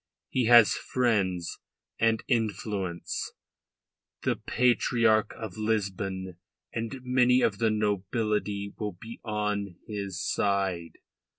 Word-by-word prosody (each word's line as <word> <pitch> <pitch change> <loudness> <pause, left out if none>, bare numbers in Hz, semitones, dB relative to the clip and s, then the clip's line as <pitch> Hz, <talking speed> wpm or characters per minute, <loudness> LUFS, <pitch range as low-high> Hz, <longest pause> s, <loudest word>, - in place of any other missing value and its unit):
He 130 -2 +1
has 120 -2 +8
friends 100 -9 0 0.4
and 115 -1 +2
influence 105 -6 -2 0.9
the - - +2
Patriarch 115 -3 +2
of 110 -5 -7
Lisbon 95 -4 -2 0.4
and 115 +3 -4
many 125 0 +4
of 100 -2 +1
the 115 - +3
nobility 105 -1 -1
will 105 -3 -2
be 115 +6 -10
on 105 -3 -2
his 100 -4 -4
side. 95 -6 0
105 Hz, 100 wpm, -28 LUFS, 100-115 Hz, 0.9 s, has